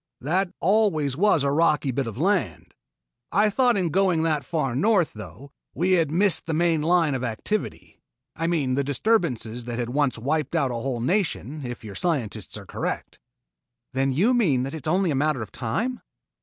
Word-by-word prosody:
That 180 +6 0
always 170 -8 +2
was 180 -3 +3
a 140 - +1
rocky 150 -2 +2
bit 130 0 -2
of 115 - -6
land. 190 +5 -1 0.6
I 210 +1 +3
thought 245 0 +3
in 180 -3 0
going 180 -2 +2
that 155 -3 0
far 145 -7 -2
north, 185 - +2
though, 125 +6 -11 0.2
that - - -11
we 180 +2 +2
had 165 -5 +3
missed 175 +1 +2
the 160 - -1
main 165 -1 +2
line 165 -2 +2
of 130 -1 -3
activity; 125 - -4 0.3
I 165 +1 -2
mean 150 -7 0
the 140 +2 +1
disturbances 135 - 0
that 120 -1 -4
had 120 -1 -2
once 140 -2 +1
wiped 150 +5 -1
out 140 -6 +1
a - - -3
whole 120 0 -3
nation, 155 - -1
if 120 -2 -6
your 105 -2 -8
scientists 115 - -2
are - - -10
correct." - - -4 0.7
"Then 135 +1 +1
you 195 - +3
mean 160 - +2
that 135 - -4
it 160 -1 -6
is - - +2
only 185 -1 +2
a - - 0
matter 145 -3 0
of 105 - -11
time?" 220 - -3
155 Hz, 195 wpm, -24 LUFS, 130-180 Hz, 0.7 s, was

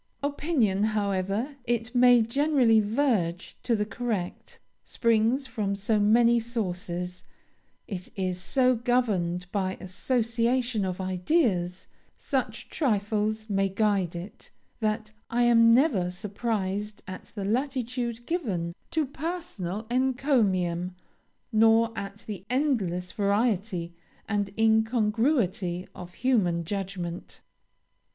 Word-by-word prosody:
Opinion, 280 - +1 0.2
however 200 +7 -1
it 240 0 -1
may 245 -1 +6
generally 255 -2 +3
verge 210 -6 0
to 235 - +1
the 210 -1 0
correct, 215 -5 -4 0.2
springs 230 +3 +1
from 205 -6 -2
so 210 +2 +1
many 235 +3 +5
sources, 180 -6 -3 0.6
it 185 -4 -6
is 185 -2 -2
so 255 +4 +3
governed 215 -8 0
by 190 -2 -1
association 230 +2 0
of 185 0 -3
ideas, 185 - 0 0.3
such - - -2
trifles 215 -4 0
may 195 -2 +1
guide 195 -3 +1
it, 175 +4 -8 0.3
that 215 -1 -1 0.2
I 240 +1 +2
am 230 -1 +6
never 230 - +3
surprised 205 +1 -3
at 185 -1 -7
the 200 -2 -3
latitude 240 0 -2
given 200 - -2 0.2
to 315 -2 0
personal 275 - -5
encomium 215 - +1 0.6
nor 225 +1 +4
at 200 0 -6
the 200 -4 -6
endless 215 - 0
variety 200 -4 0 0.3
and 205 -2 0
incongruity 220 - +1
of 175 -1 -10
human 195 -10 +1
judgment. 180 -2 -5
215 Hz, 105 wpm, -27 LUFS, 190-240 Hz, 0.6 s, may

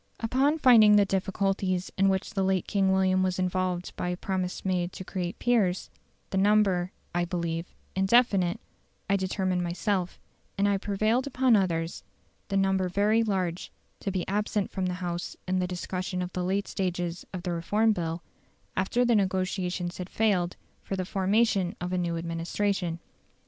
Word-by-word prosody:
Upon 265 +7 +2
finding 225 -7 +7
the 205 -1 +6
difficulties 195 -1 -1
in 195 0 +3
which 190 +3 -1
the 195 - 0
late 190 -1 +1
King 195 -2 +2
William 190 0 +3
was 185 -1 0
involved 185 -1 -1
by 180 - -2
a 180 - -2
promise 185 -1 -3
made 180 -1 0
to - - -7
create 180 -1 -4
peers, 205 -7 +1 0.4
the 190 - +1
number, 195 -3 +3 0.2
I 175 0 +1
believe, 170 -1 -3 0.2
indefinite, 195 -3 +3 0.5
I 200 - +3
determined 185 -1 0
myself, 175 +1 -1 0.4
and 200 +1 +3
I 200 -1 +2
prevailed 215 +7 0
upon 255 -3 +3
others, 170 -4 0 0.5
the 195 - 0
number 190 -1 +2
very 210 +4 +3
large, 185 -5 -1 0.3
to - - -3
be 185 -2 -2
absent 205 0 -1
from 185 -1 -1
the 180 - -2
House 175 0 -4
in 185 0 +1
the 180 - 0
discussion 180 0 -3
of 180 - -6
the 180 - -2
last 195 +3 0
stages 175 -2 -2
of 185 -2 -6
the 180 - -2
Reform 210 +6 +2
Bill, 170 -3 -3 0.5
after 215 +6 +1
the 240 - +3
negotiations 185 -3 -1
had 180 0 -5
failed 190 -5 +1 0.3
for 195 - -4
the 185 -1 -2
formation 195 0 +1
of 180 +1 -3
a - - +1
new 170 -1 -1
administration. 170 +1 -2
185 Hz, 165 wpm, -28 LUFS, 180-200 Hz, 0.5 s, finding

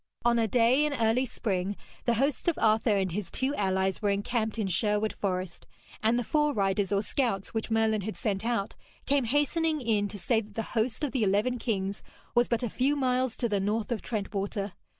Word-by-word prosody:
On 235 0 +4
a 225 - +2
day 245 +6 +4
in 300 -1 0
early 230 +2 +2
spring, 200 -4 -2 0.3
the 235 - +3
hosts 275 +7 +1
of 340 - +2
Arthur 220 -1 +3
and 190 -2 0
his 190 0 -3
two 265 +2 0
allies 190 -4 0
were 205 - +1
encamped 220 +2 -1
in 215 - 0
Sherwood 210 +3 +1
Forest, 185 -2 -3 0.3
and 225 +2 +3
the 245 - 0
fore 300 +3 +1
riders 195 -1 +1
or 200 0 +2
scouts, 220 -5 -1
which 220 0 -2
Merlin 220 -1 +2
had 195 -2 -5
sent 195 +2 -1
out, 230 -3 -1 0.3
came 275 -2 +2
hastening 300 +5 +1
in 220 -5 +1
to 205 - -7
say 220 +5 +1
that 205 -2 -15
the 225 - -1
host 235 +4 0
of 290 - 0
the 260 - -1
eleven 210 +5 +1
kings 200 -4 -2 0.3
was 240 0 +3
but 235 +1 0
a - - +1
few 265 +6 +1
miles 255 -2 0
to 240 - +1
the 205 -3 0
north 210 +4 -1
of 230 - -1
Trent 215 -3 -4
water. 200 0 -2
220 Hz, 210 wpm, -28 LUFS, 200-250 Hz, 0.3 s, On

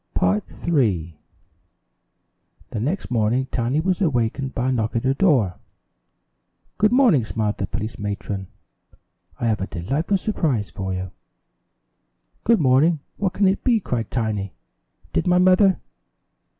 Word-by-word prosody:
Tiny 95 +3 +3
is - - -16
Adopted 100 - +1 1.6
The 110 - -3
next 150 - -2
morning 120 +3 +1
Tiny 125 +5 0
was 185 +2 0
awakened 135 - 0
by 125 +1 0
a - - +1
knock 115 -3 -1
at 115 - 0
her 130 +1 +2
door. 135 - +2 1.2
"Good 215 +1 +4
morning," 240 - +4
smiled 110 -1 -2
the 95 - -1
police 110 +2 -5
matron. 100 -1 -4 0.9
"I - - -2
have 110 -4 +1
a 95 - -2
delightful 140 - -1
surprise 145 - -1
for 95 +2 -4
you." 90 0 -4 1.3
"Good 230 -1 +4
morning. 145 +3 +3 0.2
What 195 -2 -1
can 200 +1 +3
it 190 +1 0
be?" 240 -4 +3
cried 120 - -3
Tiny. 105 -5 -2 0.6
"Did - - 0
my 180 0 +4
mother 185 +1 +5
125 Hz, 140 wpm, -22 LUFS, -, 1.6 s, mother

